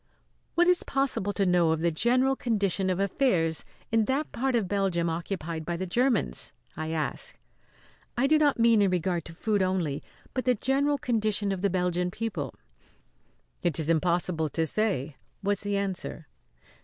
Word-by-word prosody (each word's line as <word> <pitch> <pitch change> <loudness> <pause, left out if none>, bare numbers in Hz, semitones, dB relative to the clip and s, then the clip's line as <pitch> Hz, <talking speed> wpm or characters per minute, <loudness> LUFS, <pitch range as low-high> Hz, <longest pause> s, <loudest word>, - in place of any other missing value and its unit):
"What 345 +1 +4
is 360 -1 +4
possible 270 -7 -1
to 200 - +1
know 175 -2 +3
of 160 0 +1
the 170 0 +2
general 255 +9 +2
condition 200 -6 +1
of 185 0 0
affairs 185 - +1 0.3
in 225 -1 +3
that 275 +5 -1
part 265 +1 0
of 220 -5 +1
Belgium 180 -4 0
occupied 165 -1 -4
by 170 +2 -3
the 185 - -3
Germans?" 235 - 0 0.2
I 155 0 -4
asked. 160 -2 -3 0.8
"I 255 - +3
do 305 +2 +4
not 290 -2 +3
mean 230 -2 +5
in 200 - +4
regard 180 -1 -1
to 165 - -9
food 205 +2 0
only, 180 -6 0 0.3
but 255 - -2
the 250 -1 +4
general 280 +5 +1
condition 215 -5 0
of 190 -2 -3
the 200 - +2
Belgian 180 -1 0
people." 180 - -4 1.1
"It 170 -5 +1
is 160 +1 +2
impossible 165 -1 +1
to 160 +2 0
say," 155 -8 -1 0.3
was 200 0 0
the 205 -1 -1
answer. 185 - -3
190 Hz, 165 wpm, -28 LUFS, 170-230 Hz, 1.1 s, mean